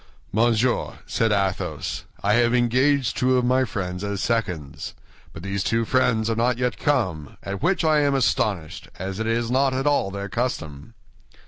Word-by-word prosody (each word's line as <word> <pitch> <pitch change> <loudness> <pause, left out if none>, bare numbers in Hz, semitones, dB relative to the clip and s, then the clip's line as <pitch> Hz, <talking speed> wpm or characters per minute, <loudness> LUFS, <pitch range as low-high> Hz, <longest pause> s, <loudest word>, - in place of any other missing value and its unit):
"Monsieur," 120 +3 +2
said 105 +3 0
Athos, 100 -2 -1 0.2
"I 105 +1 +3
have 120 +1 +3
engaged 125 +2 +2
two 130 0 +2
of 125 - +1
my 130 +1 +3
friends 90 -4 -4
as 100 -1 -2
seconds; 90 -13 -2 0.4
but 80 - -10
these 100 0 -2
two 115 0 +1
friends 115 -3 +2
are 115 - 0
not 120 +1 +1
yet 125 -2 -1
come, 95 - -1
at 100 0 -5
which 185 0 +1
I 155 -1 +4
am 140 -1 +2
astonished, 105 - 0
as 95 +2 -5
it 110 - -1
is 115 +1 0
not 130 0 +2
at 135 +2 -1
all 145 -9 +2
their 100 +1 -5
custom." 95 - -4
115 Hz, 175 wpm, -24 LUFS, 100-125 Hz, 0.4 s, I